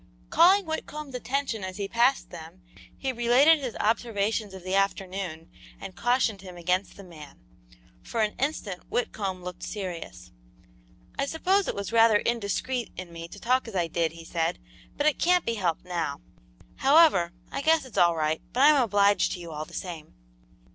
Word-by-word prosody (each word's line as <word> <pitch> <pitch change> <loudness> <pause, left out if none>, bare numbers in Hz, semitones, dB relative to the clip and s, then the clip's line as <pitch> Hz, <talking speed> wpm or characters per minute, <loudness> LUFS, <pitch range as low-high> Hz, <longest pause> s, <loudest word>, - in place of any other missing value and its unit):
Calling 380 +3 +5
Whitcomb's 305 -3 -5
attention 250 -3 -2
as 185 +1 -6
he 200 -1 -3
passed 240 +5 +2
them, 175 +2 -11 0.3
he 270 - -2
related 250 +7 +5
his 255 -5 -5
observations 215 -1 0
of 190 - -10
the 185 +1 -4
afternoon 190 -4 -1 0.3
and 185 - -9
cautioned 240 -3 +1
him 185 -2 -10
against 180 +3 -1
the 200 - -10
man. 155 -6 -13 0.6
For 230 - -3
an 210 - -1
instant 245 - -2
Whitcomb 195 -6 -2
looked 180 0 -7
serious. 170 - -6 0.9
"I 275 - +1
suppose 375 +6 +1
it - - -2
was 200 +2 -5
rather 225 -2 +6
indiscreet 235 +2 -2
in 180 -2 -8
me 165 0 -7
to 200 - -12
talk 255 +3 +1
as 225 - -8
I 175 -2 +1
did," 165 -1 -1
he 165 0 -11
said, 165 +1 -1 0.4
"but 290 - 0
it 305 - +2
can't 360 0 +3
be 230 - 0
helped 180 -7 -2
now. 170 - -3 0.6
However, 275 - +5 0.2
I - - -3
guess 320 0 +3
it's 255 - -4
all 170 -1 +5
right, 155 0 -1
but 255 - +1
I'm 290 -1 +7
obliged 205 -3 +3
to 180 - -6
you 170 -1 -8
all 155 0 -5
the - - -17
same." 165 -5 -7
200 Hz, 175 wpm, -27 LUFS, 175-255 Hz, 0.9 s, I'm